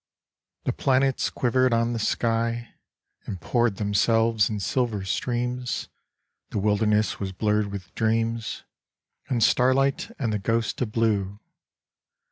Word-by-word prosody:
The - - 0
planets 135 0 +1
quivered 130 0 +2
on 115 +1 +1
the 115 - -2
sky 115 +1 -1 0.5
And 95 - -5
poured 120 +3 +1
themselves 110 +2 +2
in 105 -2 -3
silver 110 -2 -1
streams, 125 +4 -2 0.6
The - - -4
wilderness 105 +1 +1
was 95 -1 -3
blurred 105 +1 +1
with 100 -3 -8
dreams 115 0 -1 0.7
And 120 -4 +1
starlight 135 - +3
and 115 -7 -1
the 105 - 0
ghost 115 +5 -1
of 115 -4 -1
blue. 105 -3 0
115 Hz, 120 wpm, -25 LUFS, 105-120 Hz, 0.7 s, starlight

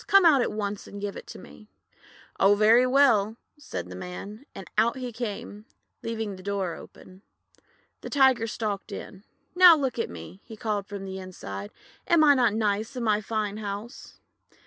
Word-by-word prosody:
Come 395 -2 +6
out 295 -6 +6
at - - 0
once 205 -1 -4
and 205 - -9
give 200 0 -4
it - - -9
to - - -9
me." 215 - -14 0.7
;<Oh, 200 +1 +5
very 225 +4 +5
well," 230 -6 +3 0.2
said 90 - -6
the 90 - -9
Man, 200 - -8
and 195 - -9
out 230 +4 +2
he 250 -1 -5
came, 210 -2 -6 0.4
leaving 220 -3 -4
the - - -11
door 195 -3 -2
open. 185 +1 -14 0.8
The - - -7
Tiger 265 -5 +3
stalked 210 -3 -4
in. 195 +1 -8 0.3
"Now 360 -1 +9
look 265 -4 -2
at - - -1
me!' 85 - -10
he 220 -2 -11
called 205 -2 -2
from 200 -1 -7
inside. 185 - -7 0.4
"Am 340 -2 +5
I 290 -1 +7
not 240 -6 +2
nice 215 +2 -1
in 250 - -3
my 215 -2 +2
fine 210 -1 -3
house?' 210 +4 -7
215 Hz, 175 wpm, -26 LUFS, 200-240 Hz, 0.8 s, Now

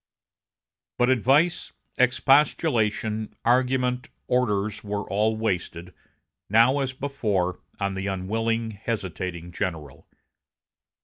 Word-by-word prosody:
But 125 +1 +3
advice, 140 - +2 0.2
expostulation, 120 -4 +2
argument, 125 +1 +1 0.2
orders, 105 -4 0
were 105 -1 -3
all 110 +2 +1
wasted, 90 -4 -3 0.6
now 115 +7 +5
as 135 -2 -1
before, 105 -10 -1 0.2
on 100 -1 -1
the 95 +1 -3
unwilling, 110 +4 -1
hesitating 95 -5 -4
general. 80 -6 -5
110 Hz, 85 wpm, -25 LUFS, 95-125 Hz, 0.6 s, now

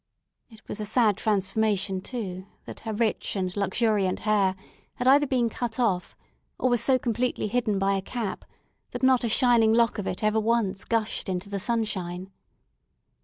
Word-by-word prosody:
It 220 -3 -18
was 210 - -6
a 210 - -3
sad 215 -2 +3
transformation, 200 -1 0
too, 190 -5 -5 0.2
that - - -9
her 225 - -5
rich 220 0 -1
and 185 -2 -2
luxuriant 200 -1 +1
hair 200 -3 +2 0.4
had 245 - -2
either 285 +2 +6
been 250 -3 +1
cut 230 0 -4
off, 190 -7 0 0.4
or 255 - +1
was 240 -3 +2
so 265 -1 +3
completely 245 -2 -1
hidden 215 -2 0
by 195 +1 +1
a 195 - 0
cap, 220 0 -4 0.5
that 245 +1 -5
not 260 -1 +4
a 235 - 0
shining 235 -2 +4
lock 230 -1 +2
of 200 - -4
it 185 - -4
ever 215 +1 +2
once 215 -3 0
gushed 225 -3 -1
into 185 +2 -3
the 200 -1 -3
sunshine. 190 -5 -3
215 Hz, 170 wpm, -26 LUFS, 195-235 Hz, 0.5 s, either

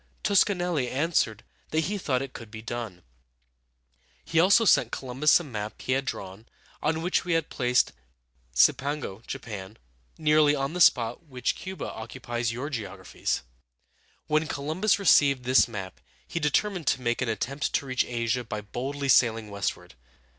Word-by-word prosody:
Toscanelli 180 -9 +2
answered 130 -7 0 0.3
that 155 - +1
he 200 +5 -2
thought 135 -6 0
it 135 - -8
could 115 -2 -9
be 110 0 -9
done. 115 -7 -6 1.2
He 165 - +1
also 200 +6 +5
sent 120 - +4
Columbus 135 +5 +3
a - - -6
map 110 -7 -6
he - - -4
had 135 +1 +1
drawn, 100 -2 -6 0.3
on 160 +1 0
which 180 - +1
he 175 -2 -2
had 165 -2 0
placed 125 -1 +2 0.6
Cipango 120 - +2
(Japan) 105 -2 -7 0.4
nearly 150 -1 +4
on 135 +2 -2
the 180 - -2
spot 120 +3 +3
which 125 -3 -2
Cu´ba 190 +1 -6
occupies 120 +1 -4
in 115 - -4
your 140 +5 -4
geographies. 100 -6 -3 0.8
When 155 +1 +1
Columbus 155 +9 0
received 140 -9 +4
this 130 +2 +4
map 95 -5 -7 0.3
he 170 - -3
determined 165 +2 0
to 130 - +2
make 120 0 -1
an 125 - 0
attempt 135 +7 -2
to - - 0
reach 130 -1 +1
Asia 120 0 -1
by 110 -2 -5
boldly 135 +7 -4
sailing 115 -5 +3
westward. 100 -1 -4
130 Hz, 155 wpm, -27 LUFS, 115-155 Hz, 1.2 s, also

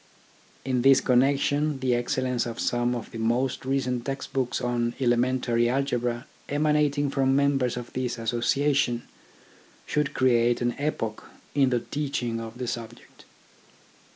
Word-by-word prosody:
In 130 -2 +1
this 135 +1 +6
connection 140 +3 +2
the 130 -1 +1
excellence 120 0 0
of 115 -1 -6
some 120 0 0
of 120 - -6
the 115 - -7
most 120 +4 0
recent 130 -2 -1
text 135 +1 -5
books 130 -2 0
on 120 -1 -1
elementary 120 -1 +2
algebra 125 -2 -1 0.2
emanating 145 -1 +1
from 135 -1 +2
members 135 -3 +2
of 120 -1 -7
this 125 -1 -2
Association, 120 +2 +1 0.8
should 150 -1 -1
create 120 -2 +3
an 120 0 0
epoch 115 -7 -3 0.3
in 140 -2 +3
the 120 -2 +1
teaching 125 -6 -3
of 115 +1 -8
the 125 - -3
subject. 115 -1 -7
125 Hz, 135 wpm, -26 LUFS, 120-135 Hz, 0.8 s, this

